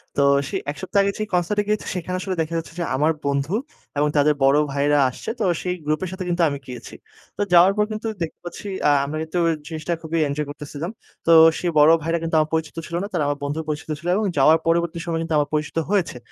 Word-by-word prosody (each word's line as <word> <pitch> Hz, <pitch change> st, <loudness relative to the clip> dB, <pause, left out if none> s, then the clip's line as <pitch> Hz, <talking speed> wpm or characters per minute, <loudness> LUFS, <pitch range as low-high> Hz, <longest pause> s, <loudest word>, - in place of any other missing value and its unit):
তো -, -, +2 dB, 0.3 s
সে -, -, -5 dB, 0.2 s
১ -, -, -10 dB
সপ্তাহ 195 Hz, +2 st, 0 dB
আগে 200 Hz, -, +1 dB
যে, -, -, 0 dB
কনসার্ট 180 Hz, +3 st, +1 dB
এ -, -, -4 dB
গিয়েছি, 210 Hz, 0 st, 0 dB
সেখানে 180 Hz, 0 st, -3 dB
আসলে 190 Hz, 0 st, -3 dB
দেখা 160 Hz, +1 st, -3 dB
যাচ্ছে, 165 Hz, 0 st, -6 dB
যে, -, -, 0 dB
আমার 150 Hz, +4 st, +2 dB
বন্ধু 140 Hz, +3 st, 0 dB, 0.4 s
এবং 145 Hz, +1 st, +3 dB
তাদের 150 Hz, +1 st, +4 dB
বড় 135 Hz, +2 st, +5 dB
ভাইয়েরা 145 Hz, +1 st, +2 dB
আসছে। 125 Hz, -, -8 dB
তো -, -, 0 dB, 0.2 s
সেই 180 Hz, 0 st, -2 dB
গ্রুপের 155 Hz, +5 st, -1 dB
সাথে, 185 Hz, 0 st, -5 dB
কিন্তু 175 Hz, 0 st, 0 dB
আমি 140 Hz, -, -3 dB
গিয়েছি। 125 Hz, -2 st, -9 dB, 0.4 s
তো -, -, -2 dB
যাওয়ার 175 Hz, +2 st, +7 dB
পর 210 Hz, -, +3 dB
কিন্তু 215 Hz, +1 st, -4 dB
দেখতে 165 Hz, -, -4 dB
পাচ্ছি, 175 Hz, +4 st, -7 dB, 0.2 s
আ -, -, +5 dB, 0.2 s
আমরা 150 Hz, +2 st, -4 dB
কিন্তু 160 Hz, +3 st, -3 dB, 0.3 s
জিনিসটা 160 Hz, +1 st, -3 dB
খুবই 165 Hz, 0 st, -2 dB
এনজয় 145 Hz, +1 st, -2 dB
করতেছিলাম। 150 Hz, +4 st, -6 dB, 0.3 s
তো 165 Hz, -, +4 dB, 0.3 s
সেই 175 Hz, -, -1 dB
বড় 150 Hz, +2 st, +7 dB
ভাইরা 165 Hz, +2 st, 0 dB
কিন্তু 165 Hz, 0 st, -1 dB
আমার 155 Hz, 0 st, +1 dB
পরিচিত 160 Hz, -1 st, -1 dB
ছিল 170 Hz, -, -5 dB
না। -, -, -3 dB
তারা 170 Hz, -4 st, +1 dB
আমার 145 Hz, 0 st, -1 dB
বন্ধুর 145 Hz, +3 st, -2 dB
পরিচিত 150 Hz, +1 st, -4 dB
ছিল, 170 Hz, -, -8 dB
এবং 215 Hz, +2 st, 0 dB
যাওয়ার 155 Hz, +4 st, +6 dB
পরবর্তী 170 Hz, 0 st, +1 dB
সময়ে 165 Hz, -1 st, -1 dB
কিন্তু 165 Hz, -1 st, -1 dB
আমার 145 Hz, 0 st, 0 dB
পরিচিত 150 Hz, +1 st, -2 dB
হয়েছে। 185 Hz, -10 st, 0 dB
160 Hz, 230 wpm, -22 LUFS, 150-175 Hz, 0.4 s, যাওয়ার